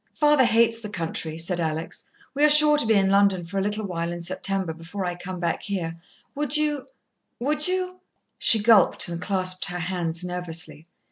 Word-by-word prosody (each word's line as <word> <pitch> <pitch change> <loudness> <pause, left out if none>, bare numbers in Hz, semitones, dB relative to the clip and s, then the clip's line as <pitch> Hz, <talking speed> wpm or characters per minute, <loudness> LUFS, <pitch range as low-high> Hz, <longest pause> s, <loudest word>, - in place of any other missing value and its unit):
"Father 295 -3 +3
hates 230 0 +2
the 215 -2 -8
country," 165 -4 -4
said 175 +2 -2
Alex. 160 +1 -4 0.3
"We 285 +2 -1
are 300 - +6
sure 300 0 +9
to 295 -6 0
be 220 - +3
in 195 -1 +2
London 195 -2 +2
for 195 +4 -5
a - - -1
little 210 +2 -3
while 170 -2 -4
in 175 0 -7
September, 185 -1 -1
before 170 +4 -7
I 175 - -3
come 180 +1 -8
back 170 -1 -2
here. 175 -5 -4 0.4
Would 295 0 +2
you 300 -2 -2 0.5
would 300 +5 0
you 365 0 -3 0.2
" - - -51
She 220 -3 +5
gulped 210 -2 +4
and 170 0 -6
clasped 185 -1 -1
her 180 -2 -5
hands 170 -1 -4
nervously. 165 -3 -5
190 Hz, 195 wpm, -23 LUFS, 170-230 Hz, 0.5 s, sure